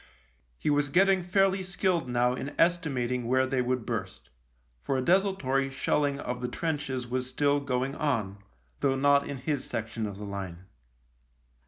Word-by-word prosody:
He 150 - 0
was 145 0 +2
getting 190 +4 +4
fairly 190 +2 +2
skilled 185 -5 0
now 125 0 +2
in 135 +3 -5
estimat 160 -8 +1
ing 125 -2 -2
where 130 +1 +3
they 130 -1 0
would 125 -2 -1
burst, - - -5 0.5
for 135 - -1
a - - 0
desultory 170 -7 +2
shelling 140 +1 0
of 125 -3 -4
the 125 - -1
trenches 145 -3 -2
was 125 +1 -3
still 145 +1 +2
going 135 -1 -1
on, 110 -11 -1 0.4
though 135 -1 +2
not 140 +1 +3
in 140 - -4
his 140 +1 -2
section 110 0 -3
of 100 -1 -7
the 105 - -7
line. 95 -3 -6
135 Hz, 165 wpm, -28 LUFS, 125-150 Hz, 0.5 s, getting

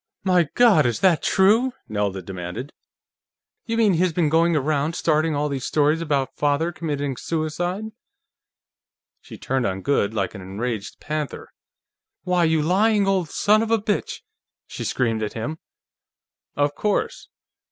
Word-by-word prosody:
"My 180 -5 +3
God, 210 - +5
is 120 - -2
that 180 -5 +4
true?" 220 +7 +3
Nelda 100 -3 -2
demanded. 90 - -6 0.9
"You 230 0 -1
mean, 215 -4 +4
he's 180 +1 +2
been 160 -2 +1
going 165 +2 +3
around 150 +2 0
starting 155 -1 +1
all 145 +1 0
these 140 -3 -4
stories 150 +3 +1
about 145 -4 -1
Father 145 +3 +1
committing 145 -5 -3
suicide?" 170 - -2 1.4
She - - -11
turned 130 -2 -1
on 95 0 -4
Goode 110 -6 +1
like 95 -3 -1
an 100 - -8
enraged 105 +3 -5
panther. 150 -1 -5 0.7
"Why, 180 -2 +2
you 160 -1 +2
lying 205 +5 +3
old 190 -5 +1
son 210 +6 +3
of 225 - -2
a 225 - +4
bitch!" 210 -1 -2 0.4
she - - -7
screamed 115 -3 0
at 105 - -3
him. 150 +8 -5 1.0
"Of 145 0 +1
course. 210 +5 -2
155 Hz, 145 wpm, -23 LUFS, 130-180 Hz, 1.4 s, God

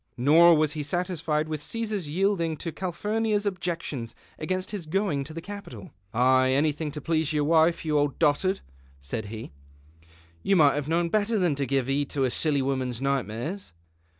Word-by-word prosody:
Nor 165 +7 +6
was 155 -1 +2
he 155 - -3
satisfied 160 -1 -1
with 155 -2 -4
Ca 230 +8 -2
sar's 205 -8 -4
yielding 170 -2 0
to 165 - -5
Cali)hurnia\s 210 +4 -1
objections 170 - -3 0.2
against 185 +4 -3
his 195 -7 -6
going 165 -5 0
to 160 - -9
the 165 +1 -6
Capitol. 200 - -9 0.2
'" - - -40
Ay, 130 +2 +4
anything 150 +2 +1
to 150 - -5
please 160 0 0
your 150 -1 +1
wife, 160 +2 +3
you 150 -1 +2
old 145 -1 0
dotard," 170 +5 +2 0.4
said 70 +12 -5
he; 110 +2 -8 0.5
" 85 +1 -28
you 195 - +2
n>ight 150 -5 +5
have 145 0 -3
known 170 +1 +1
better 215 +3 +1
than 180 -6 +2
to 140 -1 -2
gi\e 135 0 +1
heed 135 +2 -1
to 140 - -1
a 130 - +1
silly 145 -2 +1
wonums 130 -3 -2
nightmares." 135 - -3
155 Hz, 185 wpm, -26 LUFS, 135-180 Hz, 0.5 s, Nor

